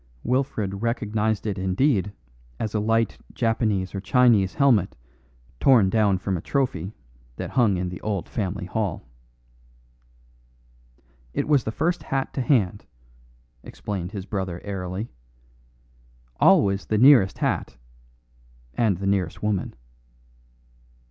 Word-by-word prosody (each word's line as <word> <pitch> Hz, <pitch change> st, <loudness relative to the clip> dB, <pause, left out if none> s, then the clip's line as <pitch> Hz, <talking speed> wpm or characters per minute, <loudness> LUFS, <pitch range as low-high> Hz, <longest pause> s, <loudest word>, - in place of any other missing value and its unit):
Wilfred 110 Hz, -6 st, -1 dB
recognised 110 Hz, -2 st, -1 dB
it 100 Hz, -3 st, -2 dB
indeed 95 Hz, -, +1 dB, 0.5 s
as 110 Hz, -, -3 dB
a 110 Hz, -, +1 dB
light 115 Hz, +1 st, 0 dB
Japanese 110 Hz, -5 st, 0 dB
or 95 Hz, -, -4 dB
Chinese 105 Hz, -2 st, +3 dB
helmet 120 Hz, -10 st, +3 dB, 0.6 s
torn 115 Hz, -9 st, +5 dB
down 105 Hz, -4 st, +3 dB
from 95 Hz, +1 st, -2 dB
a 85 Hz, -, -3 dB
trophy 115 Hz, -, -2 dB, 0.4 s
that -, -, -6 dB
hung 110 Hz, -7 st, +3 dB
in 90 Hz, 0 st, -2 dB
the 90 Hz, -, -8 dB
old 100 Hz, -5 st, -3 dB
family 100 Hz, -3 st, -3 dB
hall. 100 Hz, 0 st, -3 dB, 2.3 s
"It -, -, -1 dB
was 145 Hz, -5 st, +3 dB
the 110 Hz, -, -2 dB
first 170 Hz, +8 st, -1 dB
hat 135 Hz, 0 st, -3 dB
to 135 Hz, -, -2 dB
hand," 105 Hz, -7 st, +1 dB, 0.7 s
explained 95 Hz, +2 st, -6 dB
his 100 Hz, -3 st, -6 dB
brother 95 Hz, -4 st, -4 dB
airily; 95 Hz, +1 st, -5 dB, 1.3 s
"always 100 Hz, -1 st, +4 dB
the 110 Hz, -, +1 dB
nearest 120 Hz, -5 st, +6 dB
hat -, -, -2 dB, 1.0 s
and 105 Hz, -, +1 dB
the 95 Hz, -, -5 dB
nearest 95 Hz, -3 st, -1 dB
woman." 105 Hz, -3 st, -1 dB
105 Hz, 120 wpm, -24 LUFS, 95-115 Hz, 2.3 s, nearest